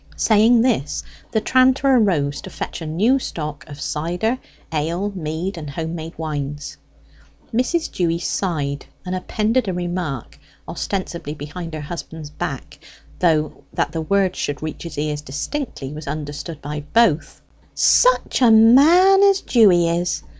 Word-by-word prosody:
Saying 225 +2 +4
this 220 - 0 0.3
the 220 - +2
tranter 260 +4 +3
arose 160 - +1
to - - -9
fetch - - -6
a 160 - -5
new 215 +13 +2
stock 150 - -5
of 145 -1 -10
cider, 180 +11 -2 0.3
ale, 170 +7 -1
mead, 170 +1 -4
and 150 -2 -7
home 160 +3 -4
made 165 0 -7
wines. 145 -2 -4 0.8
Mrs. 255 +8 0
Dewy 170 -2 0
sighed, 150 -6 -2 0.2
and 180 - -3
appended 215 +6 0
a 190 - -1
remark 175 -7 -4 0.3
(ostensibly 170 -6 -4
behind 155 +3 -7
her 155 - -5
husband's 160 -1 -7
back, 145 0 -6 0.4
though 155 -4 +1
that - - -1
the 165 - -3
words 195 +3 +1
should 145 +1 -3
reach 155 - -5
his 170 - -8
ears 150 0 -2
distinctly 150 - -5
was 155 0 -8
understood 145 +1 -6
by 150 +1 -4
both): 220 -9 +2 0.4
"Such - - +3
a 245 - +6
man 300 - +7
as 395 -1 +5
Dewy 190 -8 +4
is! 170 - -1
170 Hz, 145 wpm, -21 LUFS, 150-220 Hz, 0.8 s, man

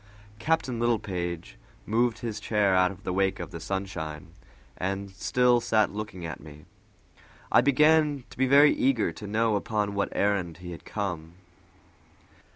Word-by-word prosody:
Captain 135 -5 0
Littlepage 90 -7 -2 0.3
moved 115 +1 +1
his 110 -3 -5
chair 105 -2 +1
out 90 0 +4
of 100 +1 -11
the 90 - -2
wake 95 +1 +1
of - - -6
the 85 - -7
sunshine, 80 -4 -5 0.5
and 95 +1 -3
still 120 +5 +2
sat 110 -2 +2
looking 100 -4 -6
at 80 - -6
me. 75 -1 -13 0.9
I - - +6
began 150 +1 +3
to - - -12
be 130 - +3
very 145 +3 +6
eager 125 -9 +1
to 100 +6 -9
know 110 +1 +1
upon 105 0 -1
what 100 0 -1
errand 95 -5 0
he 90 0 -9
had 85 - -10
come. 85 -6 -4
100 Hz, 155 wpm, -27 LUFS, 90-120 Hz, 0.9 s, I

